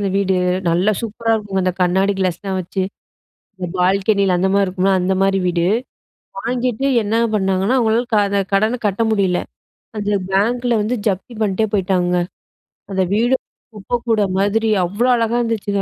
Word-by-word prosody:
அந்த 200 - 0
வீடு 195 -1 +1 0.4
நல்லா 180 +6 +2
சூப்பரா 225 0 -2
இருக்குங்க 200 -3 -2
அந்த 185 - +1
கண்ணாடி 190 +3 +2
க்ளாஸ்லாம் 190 +1 -2
வச்சு, 185 +2 -3 0.8
இந்த 180 -1 -4
பால்கனில 195 +1 +2
அந்தமாரி 195 +2 +2
இருக்கும்ல 185 +1 +1
அந்த 185 +1 +1
மாரி 195 0 +2
வீடு. 170 -1 +1 0.7
வாங்கிட்டு 245 +2 -1 0.2
என்ன 210 +2 -1 0.2
பண்ணாங்கன்னா, 195 +3 +1
அவங்களால 230 +1 +1
க - - +5
அத 200 0 +1
கடன 215 +5 +2
கட்ட 200 +3 -1
முடியல. 190 -4 +1 0.6
அந்த 205 0 -2 0.2
பேங்க்ல 240 +5 +1
வந்து 230 +4 -1
ஜப்தி 200 +5 -3
பண்ணிட்டே 210 +1 +1
போய்ட்டாங்கங்க. 180 -2 +1 0.7
அந்த 190 -1 +1
வீடு 235 +5 +2 0.4
குப்பக்கூடம் 215 -2 -1
மாதிரி 220 +3 +1 0.2
அவ்ளோ 205 +8 -1
அழகா 230 0 0
இருந்துச்சுங்க. 210 -4 -1
200 Hz, 145 wpm, -19 LUFS, 190-225 Hz, 0.8 s, க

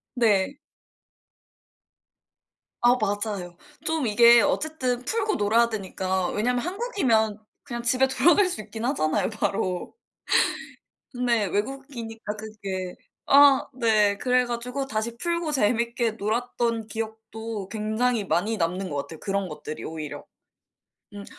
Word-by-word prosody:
네. 225 +2 +2 2.2
아 240 +1 +5
맞아요. 205 -4 -2 0.3
좀 320 -3 0
이게 235 +2 +7
어쨌든 275 -4 -1
풀고 430 - 0
놀아야 225 +3 +3
되니까 190 -3 -2
왜냐면 245 +4 0
한국이면 265 - 0 0.2
그냥 240 -1 -5
집에 255 +2 +3
돌아갈 330 +9 +4
수 355 -12 -4
있긴 220 +2 -6
하잖아요 155 - +1
바로. 195 - -2 1.2
근데 245 -4 +1
외국이니까 225 0 -4
그게 200 -4 -6 0.3
아 280 -1 +7
네 215 -4 +3
그래 250 +2 +2
가지고 245 +3 -3
다시 230 -2 -3
풀고 340 +2 -2
재밌게 235 -2 +1
놀았던 230 +1 -1
기억도 220 -1 -6
굉장히 220 +1 0
많이 205 +5 0
남는 180 +2 -1
것 145 - -3
같아요 160 +2 -6
그런 195 -1 -1
것들이 150 0 -7
오히려. 150 -2 -6 0.9
음 200 0 -8
225 Hz, 255 characters per minute, -25 LUFS, 205-250 Hz, 2.2 s, 이게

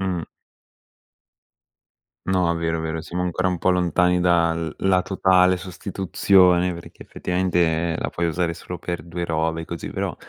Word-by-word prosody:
Mh. 95 -3 -2 2.0
No, 90 -2 +1
vero, 85 0 -1
vero, 80 0 -3
siamo 90 +2 -4
ancora 90 +1 -1
un 90 -1 -1
po' 95 - +2
lontani 90 0 +2
da 85 -2 +3
l 80 -1 -4
la 95 -1 +3
totale 95 -1 +3
sostituzione 90 -1 +2
perché 85 0 -11
effettivamente 85 -2 0
la - - -2
puoi 85 0 -1
usare 85 0 -1
solo 90 +1 -8
per 85 0 -5
2 85 +2 -5
robe 80 0 -1
così, 85 0 -6
però - - -3
90 Hz, 145 wpm, -22 LUFS, 85-90 Hz, 2.0 s, da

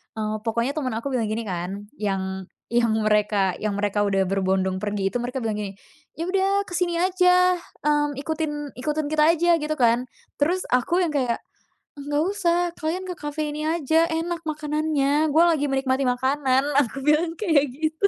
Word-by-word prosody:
eee, 215 -1 -2
pokoknya 235 +4 0
temen 255 -5 -1
aku 230 +5 -3
bilang 235 -4 0
gini 220 +2 -2
kan, 190 +1 -5
yang 190 -2 -2 0.3
yang 235 -1 +3 0.2
mereka 210 -3 +2
yang 205 -2 -1
mereka 205 0 0
udah 195 -2 +2
berbondong 190 0 0
pergi 205 -2 -1
itu, - - -1
mereka 245 +2 -4
bilang 220 -1 -1
gini, 200 -2 -4 0.5
"Ya, 330 - -2
udah 390 +2 +1
ke 360 - -10
sini 345 -1 0
aja, 360 0 +4 0.3
mmm, 295 -2 +1
ikutin 295 -1 -3
ikutin 300 +4 -2
kita 305 -1 +3
aja." 340 0 +3
gitu 310 +1 -1
kan. 240 0 +2 0.3
Terus 360 +5 +1
aku 255 +8 +2
yang 310 - -3
kayak, 250 -4 0 0.6
"Nggak 290 +2 0
usah, 350 -4 +1 0.2
kalian 330 +4 -2
ke 365 -1 -5
kafe 295 0 -3
ini 305 +1 -3
aja, 325 0 +2
enak 335 +1 -2
makanannya, 300 -1 0
gue 320 +3 +5
lagi 325 -4 +3
menikmati 270 0 0
makanan", 260 +1 +1 0.2
Aku 275 0 -1
bilang 315 +3 +2
kayak 320 -7 +2
gitu. 315 +5 +1
290 Hz, 175 wpm, -24 LUFS, 225-320 Hz, 0.6 s, gue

